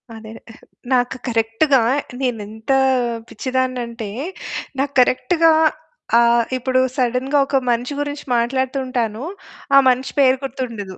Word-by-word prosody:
అదే. 220 0 -10 0.2
ఆహ్, - - -16 0.3
నాకు 245 0 +1
కరెక్ట్‌గా 230 +5 +2 0.4
నేనెంత 220 -2 -3 0.6
పిచ్చిదాన్నంటే, 250 -2 -3 0.7
నాకు 280 +1 -1
కరెక్ట్‌గా 255 +7 +3 0.7
ఆహ్, 235 0 +4 0.2
ఇప్పుడు 255 0 +1 0.2
సడెన్‌గా 255 +3 +1
ఒక 270 - +2
మనిషి 245 +4 -1
గురించి 290 0 -5
మాట్లాడుతూ 260 +3 -1
ఉంటాను. 235 -2 -2 0.5
ఆ - - +9
మనిషి 255 +1 0
పేరు 260 -1 +4
గుర్తుండదు. 230 -8 -6
250 Hz, 110 wpm, -20 LUFS, 230-265 Hz, 0.7 s, ఆ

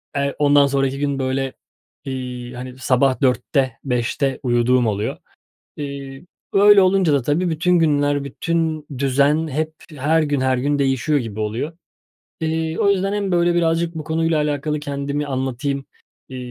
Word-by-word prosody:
eee 140 0 -1
ondan 145 -1 +5
sonraki 135 0 0
gün, 140 -1 -1
böyle, 130 0 -1 0.5
iii, 125 -2 -5
hani, 125 +1 -8
sabah 130 +1 +2
4'te, 130 +1 +1
5'te 130 +1 -1
uyuduğum 120 0 +2
oluyor. 105 0 -2 0.6
Eee, 140 0 -7 0.3
öyle 200 0 +7
olunca 185 -3 +3
da 140 -2 +2
tabii, 155 +8 0
bütün 175 +2 +2
günler, 145 -3 +2
bütün 160 +2 -2
düzen 140 +4 +2
hep 155 +2 -2 0.2
her 155 +4 +2
gün 145 -3 0
her 130 -1 +1
gün 145 +3 0
değişiyor 135 +2 +1
gibi 110 -4 -5
oluyor. 110 +9 -2 0.7
Eee, 160 0 -1
o 200 - +3
yüzden 195 0 +1
hem, 200 -2 -1
böyle, 175 0 +3
birazcık 170 0 +1
bu 155 - -5
konuyla 160 0 0
alakalı 150 0 -1
kendimi 140 0 -3
anlatayım, 135 +1 -2 0.4
eee, 130 - -8
140 Hz, 150 wpm, -20 LUFS, 130-160 Hz, 0.7 s, öyle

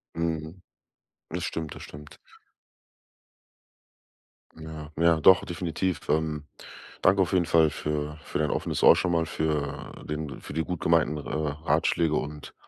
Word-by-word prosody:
Mhm. 80 +1 -3 0.7
Das 90 +1 -4
stimmt. 80 -3 -4
Das - - -10
stimmt. 75 0 -11 2.4
Ja, 80 -1 -8
ja, 85 0 +4
doch, 95 +2 +7
definitiv. 85 -1 -2
Ähm. 75 -1 0 0.6
Danke 95 +1 +5
auf 85 - -4
jeden 90 -3 +3
Fall 80 -3 +4
für 75 0 -3
für - - -4
dein 75 -1 +1
offenes - - -2
Ohr - - +9
schon 90 - 0
mal, 85 -1 +2
für 75 -3 -3
den 75 -2 -5
für - - -9
die 80 +1 0
gut 90 -1 -4
gemeinten 80 -2 +2
R 75 - -7
äh, 75 0 -3
Ratschläge 80 -2 +2
und 75 -1 -4
80 Hz, 145 wpm, -27 LUFS, 75-85 Hz, 2.4 s, Ohr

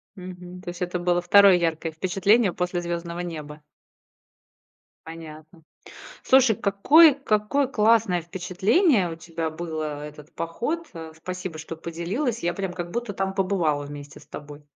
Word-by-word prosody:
Мгм. 180 -1 -10
То 185 - -7
есть 175 +1 -8
это 180 0 -2
было 175 0 +1
2 200 +2 +7
яркое 165 -1 -1
впечатление 195 +5 +2
после 180 0 -2
звёздного 170 0 -4
неба? 155 -4 -6 1.5
Понятно. 160 0 -11 0.6
Слушай, 260 -4 +5
какое 285 - +6
какое 260 +1 0
классное 215 -7 +2
впечатление 190 - +1
у - - -8
тебя 165 -1 -5
было, 155 -3 -5
этот 150 0 -11
поход. 300 - -3
А, 160 -1 -8
спасибо, 180 0 -6
что 160 +1 -7
поделилась, 185 - -3
я 175 0 -1
прям 190 -2 -3
как 175 -1 -5
будто 235 +1 -4
там 190 0 -2
побывала 175 -7 0
вместе 145 0 -10
с - - -18
тобой. 145 0 -10
175 Hz, 140 wpm, -24 LUFS, 160-200 Hz, 1.5 s, 2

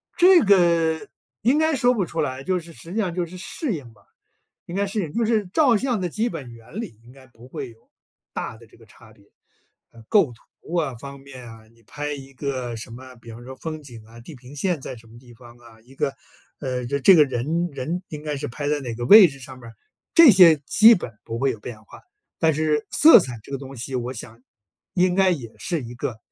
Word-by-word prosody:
这 360 -1 +6
个， 170 -3 +3 0.3
应 250 +7 +3
该 315 0 +2
说 250 -1 +3
不 200 -6 -1
出 165 - -3
来， 130 +1 -3
就 185 +3 0
是， 170 0 -13
实 165 - -13
际 - - -4
上 185 -5 -1
就 180 -1 -1
是 175 +2 -12
适 235 - -4
应 125 -8 -8
吧， 105 - -26 0.6
应 170 - -8
该 200 +1 0
适 205 +2 -3
应。 155 -4 -6
就 235 - 0
是 215 -3 +1
照 255 - +3
相 245 -1 -1
的 180 - -2
基 220 +7 -1
本 125 -4 -8
原 115 - -9
理， 175 - -8
应 120 - -16
该 135 -1 -17
不 120 -1 -17
会 135 -1 -7
有 115 -1 -23 0.4
大 110 - -5
的 115 0 -17
这 110 - -22
个 115 - -19
差 110 +1 -19
别， 100 - -24 0.6
呃， 115 - -16
构 190 - +3
图 140 +7 -13
啊， 150 -6 -1
方 140 +3 -10
面 135 -3 -12
啊， 110 -1 -13
你 115 0 -26
拍 145 +6 -5
一 135 -1 -11
个 130 -3 -4
什 115 +2 -8
么？ 130 +2 -11
比 115 0 -14
方 115 +2 -11
说 130 +1 -9
风 155 +2 -7
景 120 -6 -12
啊， 115 +1 -15
地 145 +6 -12
平 130 +3 -14
线 175 -1 -1
在 130 - -7
什 115 0 -17
么 115 +1 -15
地 120 -1 -17
方 120 0 -16
啊， 115 -2 -18
一 130 +4 -19
个， 135 0 -2 0.5
呃， 125 -3 -3
这 140 +3 -1
这 190 +8 +7
个 155 -4 +7
人 155 +7 -2
人 155 +7 -4
应 150 -1 -8
该 150 -1 -3
是 145 0 -4
拍 145 +5 -6
在 150 0 0
哪 120 -3 -5
个 120 +1 -5
位 200 - +9
置 140 - -12
上 130 0 -11
面 115 - -12
儿， 115 - -14 0.4
这 330 -6 +9
些 180 -5 +7
基 220 +8 +7
本 150 - -5
不 115 - -6
会 135 +2 +1
有 110 -4 -6
变 110 -2 -10
化。 - - -15 0.4
但 160 -3 +2
是 150 -1 0
色 315 -4 +8
彩 125 -8 -6
这 - - -13
个 135 - -3
东 135 0 -10
西 130 +3 -6
我 125 0 -3
想， 115 0 -10 0.5
应 180 0 +2
该 190 0 +3
也 125 -10 -4
是 170 -5 -3
一 120 0 -9
个 120 -2 -5
140 Hz, 260 characters per minute, -23 LUFS, 120-180 Hz, 0.6 s, 位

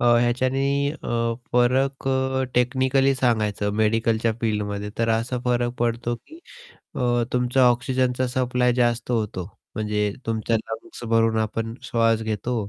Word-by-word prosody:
अ, - - +1 0.2
ह्याच्याने 130 +3 +1 0.3
अ, 115 -6 -2 0.2
फरक 130 +3 +2
अ, 130 0 +1
टेक्निकली 130 +2 +2
सांगायचं 110 -5 0
मेडिकलच्या 115 +1 +1
फिल्डमध्ये 105 -2 -2
तर 115 0 +1
असा 115 +3 0
फरक 120 -1 +1
पडतो, 120 0 0
की 315 - -16 0.6
अ, 120 -1 +1
तुमचा 125 +1 +3
ऑक्सिजनचा 125 +1 +1
सप्लाय 125 0 +1
जास्त 120 0 +1
होतो. 105 -6 -1 0.3
म्हणजे 105 -1 -1
तुमच्या 115 0 0
लंग्स 110 +2 -7
भरून 115 0 +3
आपण 115 +1 -2
श्वास 115 -1 +1
घेतो 110 +3 -2
120 Hz, 130 wpm, -23 LUFS, 110-125 Hz, 0.6 s, तुमचा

